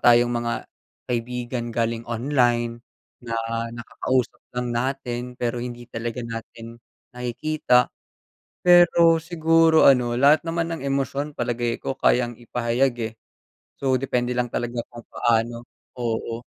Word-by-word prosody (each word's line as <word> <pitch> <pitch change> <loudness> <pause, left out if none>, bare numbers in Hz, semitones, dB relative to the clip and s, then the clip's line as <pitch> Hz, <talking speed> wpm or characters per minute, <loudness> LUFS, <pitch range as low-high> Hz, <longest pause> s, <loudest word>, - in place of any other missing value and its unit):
tayong 120 0 +5
mga, 120 0 -3 0.5
kaibigan 120 0 -3
galing 115 0 -1
online, 120 -1 +1 0.4
na 115 -1 -4 0.4
nakakausap 125 +1 -2 0.2
lang 125 -1 -1
natin 125 -1 -3
pero 120 0 -2
hindi 120 0 -6
talaga 120 +1 -4
natin 115 0 -8 0.3
nakikita. 125 +1 +1 0.7
Pero 175 -2 +6
siguro, 165 -1 +4
ano, 125 -3 +4
lahat 145 +2 +5
naman 165 0 -1
ng 165 - -7
emosyon 140 +2 -1
palagay 120 -1 -1
ko 135 - -3
kayang 120 -1 +2
ipahayag, 120 +2 0 0.2
eh. - - -26 0.7
So, 130 -1 +2
depende 125 -1 0
lang 120 -1 -1
talaga 120 -1 -2
kung 120 -1 -11
paano, 115 0 0 0.3
oo. 115 0 -3
120 Hz, 120 wpm, -24 LUFS, 120-135 Hz, 0.7 s, Pero